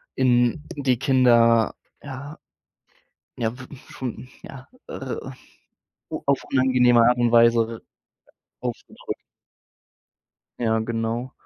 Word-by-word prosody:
in 125 +3 +2
die 130 -4 0
Kinder, 120 -4 +4 0.3
ja, 140 +2 -8 1.0
ja 115 +1 -2
w 130 - -10 0.2
schon, 125 0 -7
ja, 130 -1 -11 0.2
äh, 130 -2 -5 0.9
o - - -5
auf 140 -1 +2 0.2
angenehme 125 -2 +4
Art 125 0 +3
und 120 -1 +2
Weise 115 -1 +3 0.8
aufgedrückt. 125 -2 -6 1.4
Ja, 110 -1 +1
genau. 115 +2 -3
125 Hz, 95 wpm, -23 LUFS, 115-130 Hz, 1.4 s, Kinder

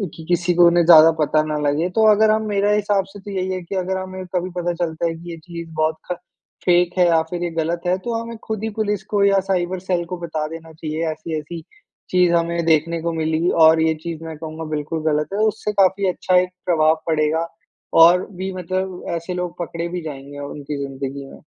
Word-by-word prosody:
कि 160 - -10
किसी 175 0 +1
को 175 0 +6
उन्हें 170 0 +4
ज़्यादा 165 -1 +9
पता 155 0 +3
ना 155 0 -2
लगे। 150 +4 0
तो 220 - +4
अगर 215 +1 +4
हम 220 0 +1
मेरा 205 0 +1
हिसाब 205 -2 +1
से 195 +2 -13
तो 200 +1 -9
यही 190 -1 -2
है, 185 - -4
कि 170 - -6
अगर 190 0 -1
हमें 185 0 -6
कभी 180 +1 -1
पता 175 0 -1
चलता 170 -1 -2
है 165 - -2
कि 170 +2 -10
ये 165 - -7
चीज़ 170 0 -9
बहुत 155 0 +1 0.2
ख - - 0 0.5
फेक 180 0 +3
है 180 - +5
या 165 -1 +4
फिर 175 0 -3
ये 175 - -1
गलत 165 +1 -2
है, 180 +1 +2
तो 235 +5 -4
हमें 230 0 -7
खुद 220 -1 -4
ही 220 - -1
पुलिस 210 -2 -1
को 200 -1 +3
या 195 -1 +4
साइबर 180 0 0
सेल 180 -1 -1
को 180 +1 -5
बता 160 -3 -3
देना 165 0 -9
चाहिए। 155 +1 -4
ऐसी-ऐसी 160 +1 -6 0.5
चीज़ 180 -1 +3
हमें 170 0 0
देखने 165 +1 +2
को 170 0 -2
मिली 160 +1 0 0.2
और 160 0 +5
ये 160 0 +3
चीज़ 165 -1 -5
मैं 160 -1 -6
कहूँगा 160 0 -7
बिल्कुल 150 +2 -3
गलत 150 0 0
है। 200 - -1
उससे 215 0 -2
काफ़ी 195 0 +3
अच्छा 180 0 +1
एक 180 - -3 0.2
प्रभाव 160 -2 +3
पड़ेगा। 160 +1 +1 0.6
और 180 +2 +5
भी 190 0 -5
मतलब 185 0 -4
ऐसे 170 +2 -4
लोग 180 -1 -4
पकड़े 170 0 -4
भी 180 0 -4
जाएँगे 145 -2 -8
उनकी 145 0 -6
ज़िंदगी 135 0 -6
में। - - -13
170 Hz, 225 wpm, -21 LUFS, 160-185 Hz, 0.6 s, ज़्यादा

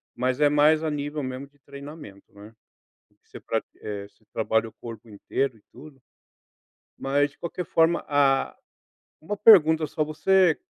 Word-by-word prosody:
mas 130 +2 -1
é 145 - +5
mais 150 +2 +4
a 160 - 0
nível 145 0 -4
mesmo 130 +2 -6
de 145 0 -32
treinamento, 140 -7 -12
né. 105 +2 -14 0.7
Você - - -12
pra - - -2 0.2
eh, 100 -1 -6
você 110 - -34
trabalha 110 +1 0
o - - -25
corpo 115 -1 -11
inteiro 115 +4 -3
e - - -25
tudo, 135 0 -15 1.0
mas 145 +1 0
de - - -26
qualquer 170 +1 -5
forma 165 +1 +2
a 140 -2 +2 0.7
uma 205 +6 -5
pergunta 160 -8 +6
só 155 - -2
você 175 +3 +2
145 Hz, 155 wpm, -25 LUFS, 120-155 Hz, 1.0 s, pergunta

